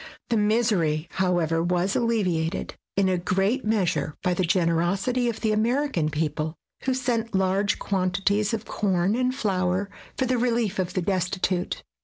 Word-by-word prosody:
The 235 Hz, -, +2 dB
misery, 210 Hz, -8 st, +2 dB
however, 175 Hz, -4 st, +1 dB
was 180 Hz, +3 st, 0 dB
alleviated 185 Hz, -8 st, 0 dB, 0.2 s
in 195 Hz, -1 st, +3 dB
a 185 Hz, -1 st, +1 dB
great 195 Hz, +8 st, 0 dB
measure 175 Hz, -9 st, 0 dB
by 180 Hz, -2 st, +2 dB
the 175 Hz, -, -1 dB
generosity 185 Hz, +8 st, +1 dB
of 230 Hz, -, -5 dB
the 220 Hz, -, +1 dB
American 225 Hz, -, +1 dB
people, 155 Hz, +1 st, -2 dB, 0.3 s
who 260 Hz, -1 st, +1 dB
sent 235 Hz, -4 st, -1 dB
large 190 Hz, +2 st, +2 dB
quantities 200 Hz, +2 st, 0 dB
of 225 Hz, -1 st, -3 dB
corn 195 Hz, -1 st, +1 dB
and 255 Hz, +1 st, 0 dB
flour 190 Hz, -2 st, 0 dB, 0.3 s
for 260 Hz, -, +1 dB
the 255 Hz, -1 st, +1 dB
relief 230 Hz, -5 st, 0 dB
of 180 Hz, -1 st, -2 dB
the 185 Hz, -, 0 dB
destitute. 185 Hz, -1 st, -1 dB
195 Hz, 150 wpm, -25 LUFS, 175-225 Hz, 0.3 s, in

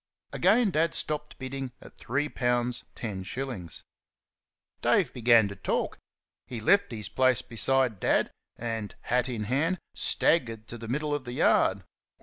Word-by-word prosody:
Again 210 Hz, +4 st, +4 dB
Dad 165 Hz, 0 st, +1 dB
stopped 150 Hz, -1 st, -3 dB
bidding 130 Hz, -1 st, -5 dB
at -, -, -14 dB
three 145 Hz, +5 st, -1 dB
pounds 120 Hz, -2 st, 0 dB
ten 105 Hz, -5 st, -4 dB
shillings. 95 Hz, -, -6 dB, 1.0 s
Dave -, -, +2 dB
began 115 Hz, -3 st, +5 dB
to 100 Hz, -, -7 dB
talk. 95 Hz, -, -2 dB, 0.5 s
He 120 Hz, -, -5 dB
left 200 Hz, -, +3 dB
his 110 Hz, -3 st, -4 dB
place 130 Hz, -2 st, +3 dB
beside 125 Hz, -2 st, +1 dB
Dad -, -, +2 dB, 0.2 s
and, 115 Hz, -3 st, -4 dB
hat 125 Hz, +1 st, 0 dB
in 115 Hz, -4 st, -3 dB
hand, 145 Hz, -, +1 dB, 0.2 s
staggered 115 Hz, -9 st, +1 dB
to 120 Hz, -, -6 dB
the 115 Hz, -, -7 dB
middle 150 Hz, +5 st, -1 dB
of 145 Hz, -2 st, -2 dB
the 120 Hz, -, -5 dB
yard. -, -, +3 dB
125 Hz, 145 wpm, -28 LUFS, 115-140 Hz, 1.0 s, began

